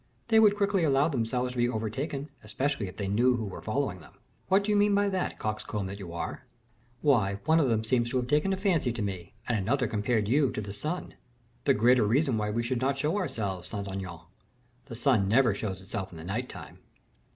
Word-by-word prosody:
"They 220 -1 +6
would 210 -2 +5
quickly 200 -3 +2
allow 140 0 +3
themselves 125 -2 -1
to 125 - -5
be 120 0 +3
overtaken, 135 +7 -3
especially 125 +1 -2
if 90 - -10
they 100 - -2
knew 120 +6 +3
who 115 -2 -3
were 100 - -7
following 110 -5 -2
them." 80 - -16 0.3
"What 195 +2 +4
do 210 - 0
you - - +3
mean 205 0 +4
by 205 0 +3
that, 190 -2 -2
coxcomb 105 -1 -3
that 100 +2 -6
you 90 -4 -7
are?" 85 - -5 0.6
"Why, 110 -10 +3
one 160 +2 +4
of 140 -5 +3
them 110 -1 +1
seems 120 +1 +1
to 130 - 0
have 125 - 0
taken 150 +8 +2
a 190 - 0
fancy 180 - +1
to 115 - -4
me, 95 -1 -5
and 120 -3 +1
another 125 +7 +1
compared 110 0 0
you 135 +3 +3
to - - -3
the 100 -1 -6
sun." 155 - -4 0.5
"The 140 - +4
greater 120 +3 +5
reason 135 +3 +2
why 105 0 -1
we 115 +3 -1
should 120 +1 -1
not 135 +1 +1
show 150 +5 0
ourselves, 100 - -2
Saint 100 0 -5
Aignan. 90 -3 -6 0.6
The 125 -5 -8
sun 120 -5 +2
never 120 +1 +4
shows 95 -2 -4
itself 95 0 -4
in 85 - -10
the 80 - -8
night 110 +8 -3
time." - - -10
120 Hz, 225 wpm, -29 LUFS, 105-145 Hz, 0.6 s, They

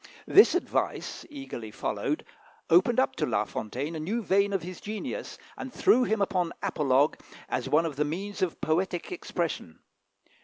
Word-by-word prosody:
This 410 -4 +7
advice, 360 - -2
eagerly 270 - -7
followed, - - -2 0.5
opened - - +5
up - - +2
to - - +1
La - - +1
Fontaine 135 +9 -4
a - - -3
new 215 +9 -2
vein 200 +1 +3
of 195 -3 -1
his 180 0 -7
genius, 215 - -5 0.2
and 265 - -6
threw 250 0 +4
him 215 -2 +1
upon 180 -3 0
apologue 145 -6 +2 0.3
as - - -2
one 165 - +4
of 150 -4 -4
the 150 - +3
means 195 +7 -4
of 185 -3 0
poetic 175 +2 0
expression. 170 - -3
180 Hz, 160 wpm, -28 LUFS, 155-205 Hz, 0.5 s, This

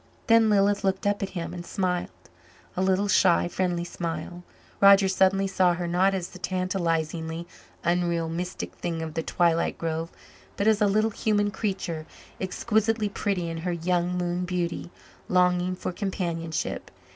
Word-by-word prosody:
Then 230 -2 +5
Lilith 205 0 +3
looked 190 0 0
up 205 0 +1
at 195 - -2
him 170 0 -4
and 175 -1 -6
smiled. 180 -1 -1 0.7
A 185 - -1
little 190 +2 +2
shy, 180 -3 +4
friendly 175 -1 -1
smile. 175 0 -5 0.4
Roger 200 0 +7
suddenly 190 +1 +3
saw 185 -2 +2
her 175 0 -3
not 185 +3 +2
as 180 -2 -3
the 180 - -12
tantalizing, 170 -3 -1 0.4
unreal, 170 -1 +1
mystic 175 +3 -4
thing 165 -2 -3
of 160 -1 -5
the 165 - -1
twilit 170 0 +1
grove, 165 0 -3 0.5
but 200 - 0
as 220 -1 +4
a 210 - +5
little 215 +2 +2
human 205 -1 +1
creature, 190 -7 -3 0.3
exquisitely 215 +3 0
pretty 195 -3 -1
in 165 0 -4
her 175 +2 -2
young 175 +1 0
moon 175 0 -1
beauty, 175 -1 -2 0.4
longing 180 0 +2
for 180 - -4
companionship. 170 -4 -3
180 Hz, 155 wpm, -26 LUFS, 170-195 Hz, 0.7 s, Roger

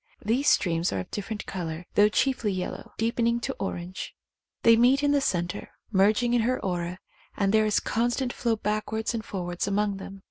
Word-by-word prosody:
These 245 +7 +3
streams 170 -2 +2
are 95 - -1
of 90 - -11
differ 205 +2 -4
ent 210 - -7
colour, 170 -2 -5
though 205 +1 +5
chiefly 240 -2 +1
yellow, 185 -1 -5
deepening 235 +1 +1
to 270 - -2
orange. 185 -1 -5 0.5
They 230 0 +7
meet 255 +5 +4
in 290 - +3
the 285 -1 +3
centre, 175 -8 -2 0.2
merging 215 +5 +3
in 240 - +4
her 250 +3 +1
aura, 175 -1 -2 0.4
and 200 0 +1
there 215 0 +4
is 210 - +2
a - - +2
constant 240 +2 0
flow 235 -2 0
back 215 0 -2
wards 220 +2 -1
and 225 -2 -3
forwards 175 -2 -3
among 200 0 0
them. 195 0 -9
210 Hz, 200 wpm, -27 LUFS, 185-235 Hz, 0.5 s, They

